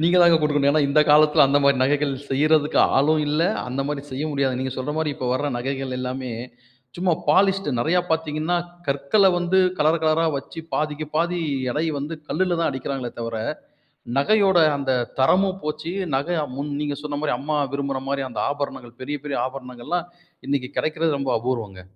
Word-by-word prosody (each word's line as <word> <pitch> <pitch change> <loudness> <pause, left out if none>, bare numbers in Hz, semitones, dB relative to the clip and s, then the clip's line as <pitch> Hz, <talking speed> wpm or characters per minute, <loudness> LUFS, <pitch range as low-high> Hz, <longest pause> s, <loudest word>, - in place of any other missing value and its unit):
நீங்கதாங்க 175 -1 +6
கொடுக்கணும். 145 -2 +2
ஏன்னா 155 0 +3
இந்த 150 +2 +4
காலத்துல 150 -1 +6
அந்த 140 +1 +4
மாதிரி 140 -1 +4
நகைகள் 145 0 +1 0.2
செய்யறதுக்கு 150 +2 +2 0.2
ஆளும் 150 +3 +3
இல்ல. 150 +3 +1 0.3
அந்த 130 +2 -3
மாதிரி 145 -1 -3
செய்ய 135 +3 -3
முடியாது. 135 -3 0
நீங்க 130 -1 -2
சொல்ற 130 +3 -3
மாதிரி 155 -2 0
இப்போ 130 - -5
வர்ற 145 +3 0
நகைகள் 135 +1 -3
எல்லாமே, 130 0 -4 0.7
சும்மா 180 0 +1 0.2
பாலிஷ்டு. 195 +1 +3
நிறைய 165 +9 +2
பார்த்தீங்கன்னா, 160 +1 0 0.3
கற்களை 140 +9 +3
வந்து 175 +2 +1 0.2
கலர் 155 +2 +3
கலராக 160 +1 +2
வச்சு 150 +4 -9
பாதிக்கு 150 0 -2
பாதி 175 +2 +1 0.3
எடை 155 +4 -1
வந்து 150 +4 -5
கல்லுல 180 -2 0
தான் 165 - +1
அடிக்கிறாங்களே 130 -2 -4
தவிர, 115 -1 -4 0.8
நகையோட 195 +3 +4 0.2
அந்த 135 -1 -1 0.3
தரமும் 190 +7 +3
போச்சு. 155 +2 -4 0.2
நகை 170 +6 -1 0.2
முன் 145 +1 -4
நீங்க 145 -1 -2
சொன்ன 145 -1 -3
மாரி, 150 - +1
அம்மா 150 +3 -1 0.2
விரும்புற 140 -1 -2
மாரி 140 -1 -1
அந்த 120 - -5
ஆபரணங்கள், 135 -4 -5
பெரிய 145 +3 -3
பெரிய 145 -2 -2
ஆபரணங்கள்லாம் 130 +6 -5 0.4
இன்னைக்கு 135 -2 -1
கிடைக்கிறது 155 -1 0
ரொம்ப 135 -2 -1
அபூர்வம்ங்க. 110 -6 -4
145 Hz, 165 wpm, -23 LUFS, 135-160 Hz, 0.8 s, நீங்கதாங்க